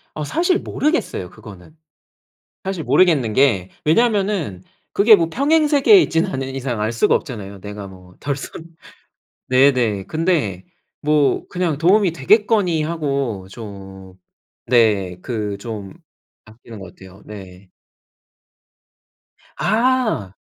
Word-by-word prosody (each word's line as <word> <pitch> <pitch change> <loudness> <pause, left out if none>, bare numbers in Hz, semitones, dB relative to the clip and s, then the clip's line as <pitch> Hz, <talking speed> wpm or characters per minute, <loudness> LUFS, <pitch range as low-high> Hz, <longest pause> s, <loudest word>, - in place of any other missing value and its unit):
아 155 - -4
사실 350 - +1
모르겠어요 295 - -2
그거는. 110 - -14 0.9
사실 190 -4 -4
모르겠는 145 -12 +3
게 105 -10 +2
왜냐하면은 195 - +1 0.3
그게 215 +1 +6
뭐 165 -1 0
평행세계에 300 - +4
있지는 165 +4 0
않은 135 0 -4
이상 125 -5 -3
알 110 +2 -1
수가 115 - +2
없잖아요 100 - -5
내가 105 -1 -8
뭐 90 -1 -16
덜 140 -1 -2
썼 - - -8 1.0
네네. 125 -7 +2
근데 155 - -1 0.4
뭐 150 -2 +1
그냥 175 -5 -1
도움이 185 +3 +3
되겠거니 185 - +2
하고 140 - -3
좀 95 -3 -11 0.5
네. 105 -7 +2
그 105 -4 -4
좀 105 -4 -7 0.5
아끼는 110 0 -13
것 95 -2 -11
같아요 95 +1 -15
네. 95 -2 -12 1.9
아. 225 - 0
130 Hz, 230 characters per minute, -19 LUFS, -, 1.9 s, 그게